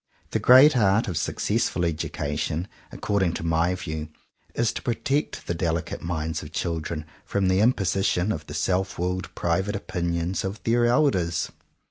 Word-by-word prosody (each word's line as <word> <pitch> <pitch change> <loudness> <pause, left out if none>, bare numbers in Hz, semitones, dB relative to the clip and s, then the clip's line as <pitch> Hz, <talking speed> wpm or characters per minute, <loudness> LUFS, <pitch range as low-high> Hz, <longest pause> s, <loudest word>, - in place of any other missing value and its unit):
The - - +1
great 130 +4 +7
art 105 0 +3
of 90 - -3
successful 105 0 0
education 75 +1 -2 0.2
according 95 -5 0
to - - -4
my 85 +2 +1
view 80 -4 -5 0.5
is 115 -1 +1
to - - -5
protect 135 +5 -1
the - - -1
delicate 85 -1 -2
minds 80 -1 -3
of 75 - -9
children 80 -2 -3 0.2
from 95 -2 0
the 95 +1 +3
imposition 100 -3 +2
of 75 -5 -5
the - - -7
self 95 0 0
willed 90 +2 -2
private 95 +5 0
opinions 85 -2 -2
of 95 +3 -4
their 120 +1 +3
elders. 105 - +2
90 Hz, 150 wpm, -25 LUFS, 85-105 Hz, 0.5 s, great